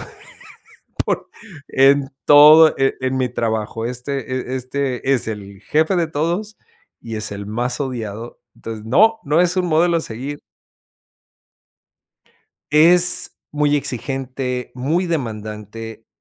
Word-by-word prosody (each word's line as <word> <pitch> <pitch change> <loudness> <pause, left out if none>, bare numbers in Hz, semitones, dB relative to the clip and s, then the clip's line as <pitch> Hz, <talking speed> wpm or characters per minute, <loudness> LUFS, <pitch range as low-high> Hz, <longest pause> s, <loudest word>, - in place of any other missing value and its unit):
por, - - -9 1.6
en 135 0 +3 0.2
todo, 150 +2 +8
eh, 135 0 +1
en 130 0 -1
mi 125 -1 0
trabajo, 115 -1 -3
este, 125 +3 -4 0.3
eh, 130 - -2
este, 130 0 -2
es 125 - -1
el 100 -2 -7
jefe 160 - +1
de 170 -2 +1
todos 175 +8 -3 0.4
y 115 -1 -7
es 110 - -2
el 100 0 -6
más 120 +5 -2
odiado, 115 -3 -6 0.2
entonces 110 -1 -8
no, 220 - +3
no 155 +4 +2
es 180 +1 +1
un 180 - +1
modelo 170 +1 +2
a - - -2
seguir. 135 +4 -6 2.3
Es 175 +4 +5
muy 150 0 +1
exigente, 130 -1 -4
muy 155 +9 -1
demandante, 110 - -6
135 Hz, 120 wpm, -19 LUFS, 115-155 Hz, 2.3 s, todo